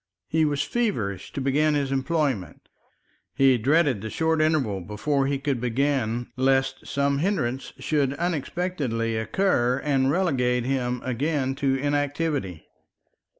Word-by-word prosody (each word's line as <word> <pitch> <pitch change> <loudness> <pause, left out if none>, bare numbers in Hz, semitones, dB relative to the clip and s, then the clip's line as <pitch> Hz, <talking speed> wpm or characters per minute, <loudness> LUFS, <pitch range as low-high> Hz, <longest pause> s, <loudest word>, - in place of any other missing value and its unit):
He 160 0 +2
was 145 -2 0
feverish 115 - -2
to 140 - -3
begin 150 +3 +2
his 140 -2 -1
employment. 135 - -1 0.7
He 135 -2 +4
dreaded 140 - +2
the 110 - -5
short 160 +5 +1
interval 140 -11 +1
before 135 - -1
he 140 0 0
could 135 -3 -2
begin, 120 -2 0
lest 135 0 +1
some 140 0 0
hindrance 140 -8 -1
should 140 -3 0
unexpectedly 150 -7 -2
occur 120 - +1
and 135 -2 +2
relegate 130 -8 +1
him 125 -2 -1
again 135 +2 0
to 135 -1 +1
inactivity. 145 - -1
135 Hz, 125 wpm, -25 LUFS, 125-150 Hz, 0.7 s, He